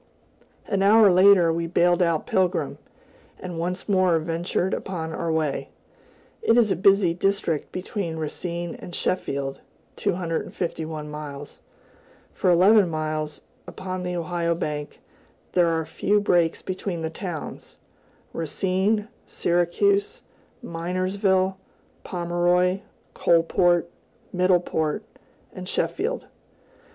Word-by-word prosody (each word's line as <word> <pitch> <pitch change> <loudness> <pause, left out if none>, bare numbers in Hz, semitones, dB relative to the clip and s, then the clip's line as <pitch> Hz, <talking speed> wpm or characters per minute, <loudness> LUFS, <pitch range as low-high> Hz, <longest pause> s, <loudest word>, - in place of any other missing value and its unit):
An 195 - 0
hour 210 0 +6
later, 180 -2 +6
we 170 0 -2
bailed 175 +1 +3
out 170 -3 +1
Pilgrim, 185 -1 0 0.6
and 175 -3 -6
once 180 +2 -3
more 185 -4 +3
ventured 170 +3 -1
upon 160 -4 -4
our 165 - -2
way. 155 -3 -1 0.7
It 240 - +3
is 225 -4 +4
a - - +3
busy 195 -2 +4
district 180 -4 -1
between 185 -3 -4
Racine 170 +2 -4
and 175 - -9
Sheffield 140 -6 -2 0.4
(251 165 -2 -3
miles). 145 -1 -8 0.7
For 185 - +1
eleven 190 +2 +6
miles, 155 -1 -3 0.2
upon 185 -1 -5
the 180 0 -3
Ohio 170 0 -1
bank, 150 -2 -4 0.5
there 175 -2 +3
are 165 -1 0
few 205 +6 +1
breaks 175 -5 +2
between 185 -2 -4
the 160 - -2
towns, 175 -3 -7 0.6
Racine, 190 +6 0 0.2
Syracuse, 400 - +1 0.4
Minersville, 185 +2 0 0.5
Pomeroy, 175 +1 +1 0.3
Coalport, 170 +1 +3 0.5
Middleport, 180 -4 +1 0.5
and - - -7
Sheffield. - - -1
175 Hz, 105 wpm, -24 LUFS, 165-190 Hz, 0.7 s, hour